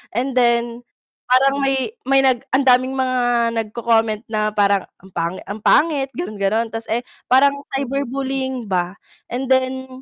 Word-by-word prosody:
And 255 +2 -1
then, 235 -1 +1 0.5
parang 275 +2 +3
may 270 - 0
may 270 0 +4
nag 260 -3 +2
ang 265 +1 +2
daming 255 +1 +4
mga 245 -2 +1
nagko,-comment 225 0 0
na 215 -1 0
parang 200 -2 +2 0.2
ang 190 - -16
pangit 170 +2 -3
ang 210 +2 -5
pangit 290 -4 +3
ganon-ganon 220 - -1
tas 225 0 -5
eh, 240 +2 0 0.3
parang 280 +2 +5 0.2
cyber 275 +1 -1
bullying 265 -3 -3
ba. 180 0 -1 0.4
And 255 +2 -3
then, 260 0 +1
245 Hz, 150 wpm, -20 LUFS, 225-265 Hz, 0.5 s, parang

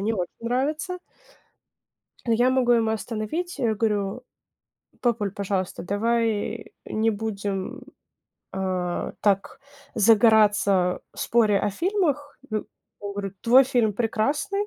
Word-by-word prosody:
не 215 +3 0
очень 180 -5 -2
нравится 295 +10 -1 1.3
но 230 - +2
я 240 +3 +4
могу 255 -2 +3
его 225 -2 +3
остановить. 225 - -3
Я 225 -3 +1
говорю: 210 +1 -1 0.8
"Папуль, 225 -5 0
пожалуйста, 195 -2 -3
давай 225 +2 -1
не 220 +1 0
будем, 200 -3 -3 0.7
а, 185 -2 -2
так 200 +3 0 0.3
загораться 210 -4 +4
в - - -15
споре 215 -4 +3
о 205 - 0
фильмах". 295 - -1
Ну, 215 -1 -2 0.3
он 205 -1 -5
говорит: 200 -1 -5
"Твой 255 +3 +6
фильм 235 -4 +1
прекрасный". 280 - -1
220 Hz, 115 wpm, -25 LUFS, 200-245 Hz, 1.3 s, Твой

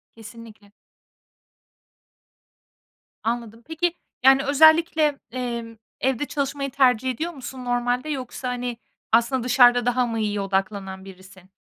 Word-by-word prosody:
Kesinlikle. 220 -2 -13 2.5
Anladım. 230 0 -4
Peki, 330 +2 -1 0.3
yani, 270 0 +6
özellikle, 315 0 +4
emm, 235 -2 -5 0.3
evde 265 +1 0
çalışmayı 275 -1 -3
tercih 260 -2 +2
ediyor 325 +8 -4
musun 260 -2 -8
normalde, 245 +3 -1
yoksa, 260 -2 -5
hani, 245 -1 -4 0.3
aslında 235 +2 +2
dışarıda 245 -1 +5
daha 245 0 +2
mı 230 -1 -3
iyiye 210 -1 -1
odaklanan 195 -1 -3
birisin? 190 -1 -15
245 Hz, 110 wpm, -23 LUFS, 225-270 Hz, 2.5 s, yani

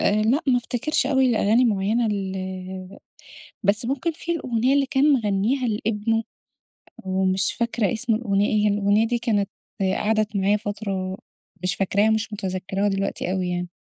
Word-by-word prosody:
آآ 210 +1 +2
لأ، 245 +7 +2
ما 250 - +5
افتكرش 255 +5 -1
أوي 265 -1 +3
الأغاني 230 0 +3
معيّنة 220 +1 +1
ال 190 -2 -5 0.6
بس 205 +4 +1
ممكن 275 +6 -1
فيه 335 +2 -4
الأغنية 255 -1 +1
اللي 280 -1 +3
كان 290 +2 +3
مغنّيها 225 +2 +1
لابنه، 225 +1 0 0.8
ومش 190 +1 +1
فاكرة 235 -3 0
اسم 230 0 0
الأغنية 205 -3 +1
إيه. 210 -1 +1
هي - - +4
الأغنية 205 +2 +2
دي 240 +1 0
كانت 215 -4 0 0.5
قعدت 215 -1 0
معايا 200 +2 +3
فترة، 200 -2 -4 0.4
مش 180 0 0
فاكراها، 200 +3 +2
مش 220 0 -1
مُتذَكِّراها 195 0 -2
دلوقتي 195 -2 -2
أوي 185 -1 -1
يعني. 180 0 -3
210 Hz, 150 wpm, -23 LUFS, 195-235 Hz, 0.8 s, ما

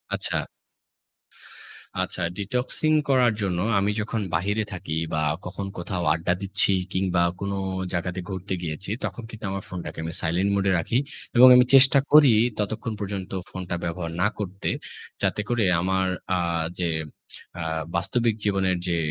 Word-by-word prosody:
আচ্ছা। - - 0 1.7
আচ্ছা, 95 - -4 0.2
detoxing 125 +9 +1
করার 125 -3 +4
জন্য 90 -3 -1 0.2
আমি 100 +1 +1
যখন 110 +1 -3
বাহিরে 100 +6 0
থাকি 80 -3 -5 0.2
বা 75 - 0 0.2
কখন 95 +2 -5
কোথাও 90 0 -3
আড্ডা 85 +2 0
দিচ্ছি 100 0 +4 0.2
কিংবা 95 -2 +1 0.2
কোন 100 0 -3 0.4
জায়গাতে 90 +1 -2
ঘুরতে 95 0 -4
গিয়েছি 80 +4 -4 0.2
তখন 120 - -6
কিন্তু 110 -2 -8
আমার 100 0 -4
ফোনটাকে 90 -3 -7
আমি 80 0 -4
silent 90 +5 0
mode 100 0 0
এ - - +3
রাখি 115 +8 0 0.4
এবং 125 +2 +9
আমি 125 - +6
চেষ্টা 135 +1 +8
করি 150 -4 +8 0.3
ততক্ষণ 110 +2 -2
পর্যন্ত 100 -2 -5 0.2
ফোনটা 90 -1 -5
ব্যবহার 85 0 -3
না 105 - +4
করতে 95 -1 -3 0.5
যাতে - - 0
করে 120 -2 +1 0.2
আমার 95 0 +1 0.3
আ - - +1 0.4
যে 85 - 0 0.7
আ - - -2 0.3
বাস্তবিক 115 +5 +1
জীবনের 95 -3 +1
যে 85 - 0
95 Hz, 150 wpm, -24 LUFS, 90-110 Hz, 1.7 s, এবং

